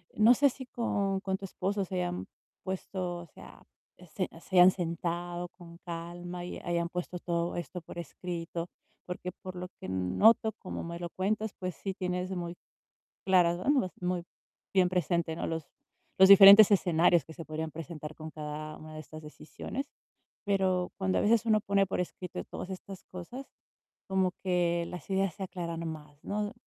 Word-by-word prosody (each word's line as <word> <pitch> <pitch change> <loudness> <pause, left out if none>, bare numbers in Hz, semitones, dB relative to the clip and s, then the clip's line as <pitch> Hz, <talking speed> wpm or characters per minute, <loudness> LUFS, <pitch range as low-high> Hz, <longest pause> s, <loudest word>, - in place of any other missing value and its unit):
No 225 +3 +7
sé 280 +2 +5
si 260 +1 -9
con 200 -5 -1
con 190 -1 -1
tu 195 - -7
esposo 195 +2 -2
se 185 - -6
hayan 180 0 -2 0.4
puesto, 185 -2 -3
o 175 - -9
sea, - - -14 0.5
se 185 - 0
se 185 - -6
hayan 180 +1 +9
sentado 175 0 -3
con 170 -2 -14
calma 175 +1 -6
y - - -6
hayan 170 -1 -1
puesto 180 0 -4
todo 170 0 -1
esto 175 +1 -5
por 170 - -11
escrito, 170 0 -5 0.4
porque 180 0 -4
por 185 -1 -7
lo 180 - -4
que - - -6
noto, 200 - +4
como 185 - -5
me 170 0 -6
lo 175 -1 -4
cuentas, 215 +3 -1
pues 185 -2 -3
sí 195 -1 -4
tienes 180 -1 -2
muy 175 -1 -4 0.7
claras, 175 -2 +4
¿no? 270 -10 +3
Muy 180 -1 -1 0.5
bien 185 -2 +5
presente, 170 -2 0
¿no? - - -3
Los 165 -2 -3 0.5
los 190 0 +9
diferentes 200 +1 +11
escenarios 175 -4 +4
que 160 - -11
se 165 - -7
podrían 155 +1 -4
presentar 155 -1 -7
con 155 0 -8
cada 155 0 -6
una 155 0 -11
de 155 - -6
estas 155 +1 -10
decisiones. 155 - -6 0.6
Pero 190 -2 +1
cuando 190 -1 +1
a - - +1
veces 230 +2 +3
uno 215 -1 +4
pone 200 0 +2
por - - -2
escrito 180 0 -5
todas - - -7
estas 190 0 -8
cosas, 215 +10 -8 0.6
como 190 -1 +2
que 175 -2 +1
las 180 - -8
ideas 195 -2 +1
se 195 - -5
aclaran 170 -3 -4
más, 150 -2 -9
¿no? 205 0 -2
180 Hz, 175 wpm, -30 LUFS, 170-190 Hz, 0.7 s, diferentes